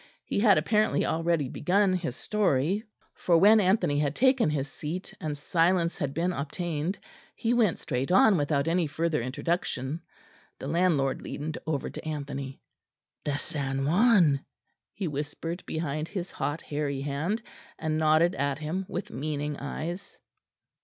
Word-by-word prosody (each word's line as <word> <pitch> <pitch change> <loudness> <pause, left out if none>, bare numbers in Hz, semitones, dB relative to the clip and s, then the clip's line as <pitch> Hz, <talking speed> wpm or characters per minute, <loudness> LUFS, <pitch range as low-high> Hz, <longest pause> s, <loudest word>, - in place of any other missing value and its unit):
He - - -1
had 205 -2 +6
apparently 210 +7 +2
already 165 -3 +1
begun 185 +8 +2
his 170 -9 -2
story, 195 0 +1 0.3
for 170 -2 +2
when 210 +5 +7
Anthony 180 -7 +2
had 145 0 0
taken 260 - +4
his 145 -2 -1
seat 155 +6 -6
and 150 -2 -3
silence 170 +3 +1
had 135 - -1
been 170 +5 0
obtained, 160 +4 -3 0.4
he 230 +1 0
went 225 -8 +3
straight 130 +2 -2
on 195 +2 +6
without 145 -1 +1
any 170 0 +2
further 160 -1 0
introduction. 135 +2 -2 0.6
The - - -8
landlord 150 -4 +1
leaned 150 +2 -5
over 150 -4 -1
to - - -7
Anthony. 140 -3 -5 0.7
"The 145 -1 0
San 135 -3 -2
Juan," 175 - +4 0.5
he 195 -3 -2
whispered 150 +4 -4
behind 155 -1 -2
his 185 -1 -5
hot 150 +2 -3
hairy 145 -2 -2
hand, 155 +11 -2 0.3
and 155 -1 -1
nodded 155 +3 +4
at 140 0 -1
him 165 +5 -3
with 180 - -4
meaning 145 +2 -3
eyes. 165 +6 -5
160 Hz, 145 wpm, -28 LUFS, 145-180 Hz, 0.7 s, when